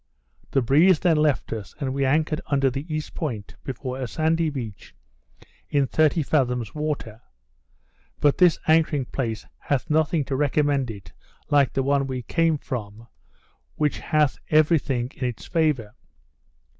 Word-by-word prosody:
The 135 - +1
breeze 155 +8 +5
then 170 -4 +3
left 150 -5 +1
us, 110 -3 -7
and 135 -3 -2
we 140 0 0
anchored 155 +3 +1
under 135 -2 +2
the 140 +6 -6
east 155 0 -4
point, 115 -10 -4
before 130 0 -5
a 130 - -2
sandy 160 +4 +1
beach, 120 -8 -7 0.7
in 140 -1 +2
thirty 155 +3 +2
fathoms 125 -7 0
water; 145 -7 -4 1.0
but 145 -1 +2
this 175 -3 +5
anchoring 155 -4 +3
place 115 -4 -4
hath 140 +1 -2
nothing 155 -1 +2
to 135 - -2
recommend 145 -2 +1
it 100 -5 -9 0.4
like 145 -2 +4
the 135 - 0
one 140 0 +1
we 130 -2 -4
came 165 +5 +1
from, 115 -4 -7 0.7
which 150 -1 0
hath 150 -4 +1
every 155 +1 +4
thing 125 -2 -2
in 130 - -2
its 120 -3 -6
favour. 150 -11 0
140 Hz, 150 wpm, -24 LUFS, 125-155 Hz, 1.0 s, breeze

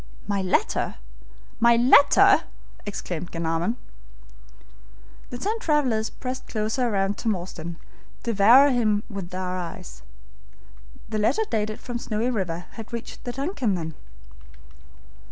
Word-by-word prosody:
"My 200 -1 0
letter! 190 - 0 0.6
my 235 0 +6
letter!" 250 +4 +6 0.4
exclaimed 175 -4 -5
Glenarvan. 165 +6 -1 1.5
The 245 - -6
ten 425 - -2
travelers 260 - +1
pressed 255 0 -6
closer 220 +3 -1
round 195 -1 0
Tom 220 -3 +1
Austin, 170 -2 -7 0.5
devouring 235 +6 +6
him 215 -4 +2
with 195 -4 -6
their 185 0 -3
eyes. 180 +1 -8 1.1
The 215 -1 -1
letter 310 - +2
dated 215 -1 -1
from 245 -1 -5
Snowy 230 +2 -1
River 180 -6 -3
had 225 -1 -10
reached 235 -1 -7
the 245 - -2
DUNCAN, 270 - -1
then. 160 -2 -4
215 Hz, 120 wpm, -25 LUFS, 185-245 Hz, 1.5 s, my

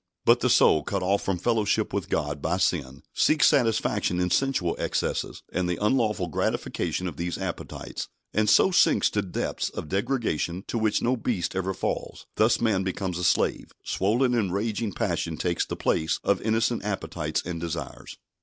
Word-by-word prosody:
But - - +6
the - - +1
soul, 75 - +5
cut 100 +2 -2
off 100 +2 +2
from 95 -2 -1
fellowship 110 +1 0
with 100 -3 -2
God, 75 -2 -1
by 85 +5 0
sin, 75 -8 -1
seeks 155 0 +3
satisfaction 115 - +2
in 90 0 0
sensual 135 -11 +1
excesses, - - -2
and 90 -1 0
the 90 - -1
unlawful 105 -3 +1
gratification 85 +3 -2
of 80 -5 -6
these 85 +1 -3
appetites, - - -5 0.3
and 105 0 +2
so 190 - +5
sinks - - +4
to 105 - +1
depths 95 -3 -3
of 75 - -7
degradation 100 - -1
to 115 - -1
which 110 -1 +1
no 125 +2 +2
beast 105 -8 -2
ever 95 0 -1
falls. - - -4
Thus 110 +2 +3
man 110 -5 +2
becomes 95 -1 -3
a - - -3
slave; 85 - +1
swollen 120 +6 +1
and 105 -6 +1
raging 105 +2 -1
passion 85 -3 -2
takes 85 +1 -1
the - - -4
place 80 0 0
of - - +1
innocent 115 +2 0
appetites 80 -6 -2
and 85 -2 -4
desires. 85 0 -6
95 Hz, 175 wpm, -26 LUFS, 85-110 Hz, 0.3 s, But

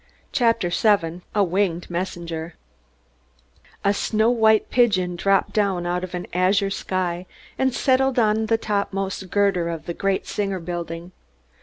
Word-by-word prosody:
CHAPTER 230 -6 +2
VII 175 -4 +2
A 205 - +4
WINGED 180 -2 -1
MESSENGER 170 -2 -4 1.3
A 200 - +4
snow 220 +3 +1
white 220 -2 +3
pigeon 190 -8 +2
dropped 195 +3 +1
down 195 -4 +1
out 180 +1 -1
of 185 0 -5
an 180 - -4
azure 195 +2 +2
sky 180 -2 -2 0.3
and 265 0 +1
settled 260 +1 +2
on 220 -1 +2
a 225 - +4
top 205 -3 -1
most 195 -1 -3
girder 195 -4 +1
of 165 -2 -5
the 170 - -3
great 195 +2 -1
Singer 195 -2 -2
Building. 170 0 -5
195 Hz, 145 wpm, -23 LUFS, 175-210 Hz, 1.3 s, A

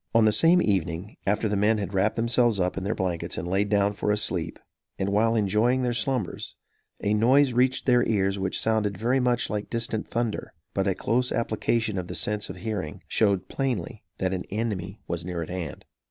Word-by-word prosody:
On 115 -1 +6
the 110 - +5
same 170 +9 +4
evening, 95 0 -1
after 105 +2 +1
the 105 - 0
men 105 +2 +3
had 100 -2 -4
wrapped 95 +3 +2
themselves 115 -2 +2
up 90 0 0
in 95 - -4
their 105 +4 -1
blankets 90 -3 -2
and 85 - -3
laid 100 +3 +1
down 100 0 +2
for 105 - -2
a 105 - +2
sleep, 105 - -1 0.4
and 95 - -1
while 110 +3 +2
enjoying 110 +5 +2
their 120 -1 0
slumbers, 120 -4 -2 0.5
a 105 - +2
noise 130 +5 +4
reached 130 +2 +2
their 125 -2 +4
ears 100 -2 +1
which 95 -1 -1
sounded 105 -3 +1
very 125 +5 +1
much 125 -1 +1
like 105 -1 -4
distant 115 -2 -2
thunder; 115 -2 -2 0.2
but 95 0 0
a 95 - +1
close 125 +3 0
application 115 -2 0
of 90 - -5
the - - -6
sense 105 0 -1
of - - -6
hearing 100 -9 -5
showed 100 -4 +1
plainly 125 -11 -3
that 95 0 -1
an 90 - -2
enemy 105 -2 -3
was 85 0 -3
near 85 -1 -3
at - - -9
hand. 90 -5 -5
105 Hz, 205 wpm, -26 LUFS, 95-115 Hz, 0.5 s, On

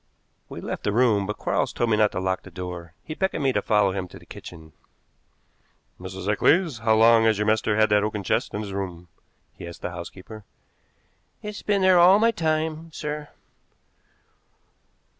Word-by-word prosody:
We - - -8
left - - -5
the 105 - 0
room, 105 -3 +2
but 105 - -4
Quarles - - -1
told 120 -1 -1
me 105 - +3
not 105 -1 +3
to - - -2
lock 95 0 -1
the - - -13
door. 90 -2 -8
He 155 - -6
beckoned 190 -3 -2
me 135 -1 +2
to - - +1
follow 105 -3 +2
him 95 -1 -4
to - - -13
the - - -17
kitchen. 80 -2 -12 1.3
"Mrs. 95 +1 -7
Eccles, 150 - +2
how 110 0 +3
long 115 0 +6
has 110 -2 +3
your 105 - 0
master 110 0 +1
had 110 0 +4
that 105 0 +4
oaken 105 -1 -3
chest - - -1
in 105 - -2
his 100 -2 -6
room?" 90 -3 -5 0.4
he - - -10
asked 85 - -11
the 90 - -3
housekeeper. 95 +5 -9 1.0
"It's 210 -1 -6
been 200 -2 +1
there 185 -1 +6
all 180 +3 +7
my 230 +2 +3
time, 160 -3 -2
sir." 150 -1 -5
110 Hz, 185 wpm, -24 LUFS, 95-150 Hz, 1.3 s, all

